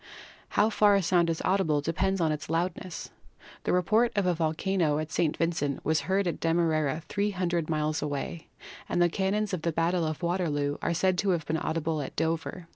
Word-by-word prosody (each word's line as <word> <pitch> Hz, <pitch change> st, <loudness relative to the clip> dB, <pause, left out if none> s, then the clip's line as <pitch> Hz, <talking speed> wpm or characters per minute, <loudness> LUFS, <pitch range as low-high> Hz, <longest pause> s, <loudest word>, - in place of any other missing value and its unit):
How 215 Hz, +2 st, +4 dB
far 205 Hz, -1 st, +5 dB
a 195 Hz, -, +2 dB
sound 170 Hz, -1 st, +3 dB
is 165 Hz, -, -2 dB
audible 185 Hz, -6 st, +2 dB
depends 185 Hz, +6 st, 0 dB
upon 160 Hz, -2 st, +2 dB
its 150 Hz, 0 st, -4 dB
loudness. 175 Hz, +1 st, -3 dB, 0.5 s
The -, -, +1 dB
report 215 Hz, +7 st, +3 dB
of 200 Hz, -2 st, +1 dB
a 180 Hz, -, +3 dB
volcano 160 Hz, 0 st, 0 dB
at 155 Hz, 0 st, -4 dB
St. 155 Hz, -2 st, 0 dB
Vincent 160 Hz, -4 st, -1 dB
was 160 Hz, +1 st, +2 dB
heard 195 Hz, +1 st, +2 dB
at 175 Hz, -, -2 dB
Demerara, 160 Hz, -2 st, +1 dB
300 180 Hz, -5 st, -1 dB
miles 155 Hz, 0 st, 0 dB
away, 150 Hz, +2 st, -4 dB, 0.4 s
and -, -, 0 dB
the 175 Hz, 0 st, +4 dB
cannons 200 Hz, +3 st, -1 dB
of 180 Hz, -, -1 dB
the 170 Hz, -, 0 dB
battle 165 Hz, +1 st, +1 dB
of 155 Hz, +2 st, -4 dB
Waterloo 150 Hz, -5 st, 0 dB
are 170 Hz, -, 0 dB
said 185 Hz, +1 st, +2 dB
to 200 Hz, -, +1 dB
have 160 Hz, -, -10 dB
been 160 Hz, +2 st, -1 dB
audible 160 Hz, -1 st, -1 dB
at 135 Hz, -, -7 dB
Dover. 165 Hz, +2 st, -2 dB
170 Hz, 195 wpm, -28 LUFS, 155-185 Hz, 0.5 s, far